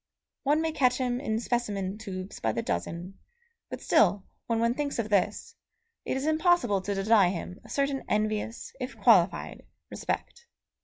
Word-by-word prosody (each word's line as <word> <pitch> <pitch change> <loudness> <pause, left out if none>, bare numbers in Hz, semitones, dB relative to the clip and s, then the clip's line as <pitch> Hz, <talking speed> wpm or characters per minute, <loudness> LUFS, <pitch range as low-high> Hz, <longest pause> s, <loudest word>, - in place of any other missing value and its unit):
One 295 +2 +2
may 325 0 0
catch 255 -5 +2
him 250 -2 -1
in 220 -5 -1
specimen 210 -5 -2
tubes 190 -3 -6
by 110 -1 0
the 115 - -2
dozen; 170 - -4 0.5
but - - -6
still, 200 -1 +3 0.2
when 230 -1 +1
one 235 +1 +2
thinks 285 +1 -2
of 225 -2 -2
this, 200 -3 0 0.5
it - - -1
is 265 - -3
impossible 315 - +3
to 200 +2 -2
deny 195 -1 +4
him 180 0 -5
a - - -15
certain 275 -1 0
envious, 215 +2 -1
if - - -5
qualified, - - +3 0.3
respect. 475 0 -4
220 Hz, 160 wpm, -28 LUFS, 195-270 Hz, 0.5 s, deny